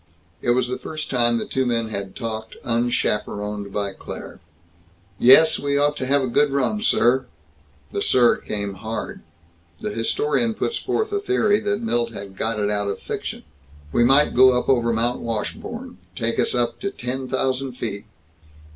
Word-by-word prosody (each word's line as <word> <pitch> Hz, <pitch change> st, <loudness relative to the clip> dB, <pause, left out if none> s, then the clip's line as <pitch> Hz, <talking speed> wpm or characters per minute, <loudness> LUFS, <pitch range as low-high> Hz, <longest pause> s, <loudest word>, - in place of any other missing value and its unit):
It -, -, -2 dB
was 125 Hz, -1 st, +2 dB
the 125 Hz, -, -3 dB
first 155 Hz, -1 st, -6 dB
time 120 Hz, -2 st, +2 dB
the -, -, -3 dB
two 130 Hz, -, 0 dB
men 115 Hz, -3 st, 0 dB
had 100 Hz, -2 st, -5 dB
talked 110 Hz, -2 st, -5 dB
unchaperoned 105 Hz, -3 st, -1 dB
by 100 Hz, -1 st, -2 dB
Claire. -, -, -9 dB, 0.8 s
"Yes. 155 Hz, +6 st, +7 dB
We 140 Hz, 0 st, 0 dB
ought 145 Hz, +1 st, +2 dB
to 130 Hz, -, -3 dB
have 140 Hz, 0 st, +3 dB
a -, -, 0 dB
good 145 Hz, +4 st, +3 dB
run, 140 Hz, +10 st, 0 dB
sir." 130 Hz, -, +3 dB, 0.6 s
The -, -, -2 dB
"sir" 120 Hz, -2 st, +4 dB
came 100 Hz, -1 st, -4 dB
hard. 110 Hz, +4 st, -5 dB, 0.6 s
The 105 Hz, -, -3 dB
historian 150 Hz, -, 0 dB
puts 460 Hz, -, -2 dB
forth 435 Hz, -1 st, -1 dB
a 405 Hz, -, 0 dB
theory 220 Hz, -, +2 dB
that 205 Hz, +1 st, -1 dB
Milt 120 Hz, -, 0 dB
had 100 Hz, -2 st, -8 dB
got 110 Hz, +2 st, -2 dB
it 105 Hz, 0 st, +1 dB
out 105 Hz, -1 st, -1 dB
of 100 Hz, -, -2 dB
fiction. -, -, -5 dB, 0.5 s
"We 120 Hz, -, +3 dB
might 135 Hz, +4 st, +5 dB
go 130 Hz, 0 st, +6 dB
up -, -, -6 dB
over 120 Hz, -3 st, +3 dB
Mount 115 Hz, +2 st, 0 dB
Washburn. 230 Hz, -, -5 dB, 0.2 s
Take 115 Hz, -3 st, -1 dB
us -, -, +1 dB
up 120 Hz, -1 st, 0 dB
to 200 Hz, -, -2 dB
ten 130 Hz, -3 st, -5 dB
thousand 130 Hz, 0 st, -1 dB
feet." 110 Hz, -4 st, -5 dB
120 Hz, 175 wpm, -22 LUFS, 110-140 Hz, 0.8 s, Yes